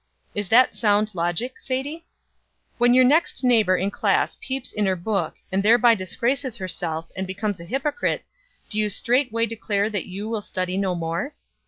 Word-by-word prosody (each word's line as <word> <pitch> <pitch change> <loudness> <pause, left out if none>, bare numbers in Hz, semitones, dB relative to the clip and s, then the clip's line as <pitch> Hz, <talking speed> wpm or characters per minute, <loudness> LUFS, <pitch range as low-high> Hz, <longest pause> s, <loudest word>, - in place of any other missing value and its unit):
Is 205 -2 -2
that 250 +3 +5
sound 210 -1 +2
logic, 175 +9 -2
Sadie? 285 +6 -4 0.7
When 245 +1 +5
your 255 - +7
next 290 +3 +3
neighbor 220 -7 +4
in 195 +3 -1
class - - +1
peeps 265 -1 -3
in 210 -2 0
her 190 - +2
book, 195 +3 -2 0.2
and 190 +1 +1
thereby 235 +3 +6
disgraces 240 +6 -1
herself, 165 -4 -3
and 190 0 -3
becomes 200 0 -3
a 170 - -9
hypocrite, 275 - -1 0.4
do 215 - -3
you 210 -1 +1
straightway 235 +1 +1
declare 215 -2 -1
that 205 -4 -2
you 200 +3 -6
will 225 -1 -2
study 185 -2 -3
no 190 -2 0
more? 170 - -3
215 Hz, 170 wpm, -23 LUFS, 190-250 Hz, 0.7 s, your